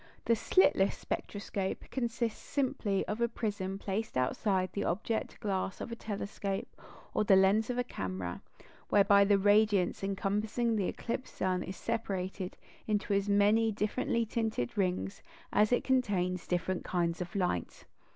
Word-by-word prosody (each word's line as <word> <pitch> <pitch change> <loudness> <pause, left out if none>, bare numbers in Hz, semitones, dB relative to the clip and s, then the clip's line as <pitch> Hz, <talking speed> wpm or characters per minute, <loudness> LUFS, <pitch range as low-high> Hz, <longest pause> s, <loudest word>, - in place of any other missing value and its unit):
The 230 - +4
"slitless 190 -1 +4
spectroscope" 200 -1 -3
consists 235 -3 -2
simply 255 -8 -1
of 215 +3 -3
a 235 - +4
prism 200 -4 -3
placed 200 -3 -3
outside 185 - +1
the 200 - -1
object 220 +5 -2
glass 190 -2 -2
of - - -6
a - - -3
telescope 200 -2 -4 0.5
or - - +2
the 200 -2 +6
lens 195 +4 +4
of 245 - -1
a 245 - +2
camera, 95 - -4 0.5
whereby 200 0 +6
the 200 0 +4
radiance 205 -2 +3
encompassing 210 +4 0
the 200 -4 +1
eclipsed 250 +2 -4
sun 185 -1 0
is 190 - -6
separated 195 -5 -3 0.3
into 210 -1 0
as 200 +1 +1
many 210 +3 +4
differently 225 +3 0
tinted 220 - -2
rings 195 0 -1 0.3
as 210 +2 +4
it 245 - +3
contains 190 -9 +1
different 180 +1 -1
kinds 170 -1 -1
of 180 +4 -6
light. 180 - -2
200 Hz, 145 wpm, -32 LUFS, 190-220 Hz, 0.5 s, the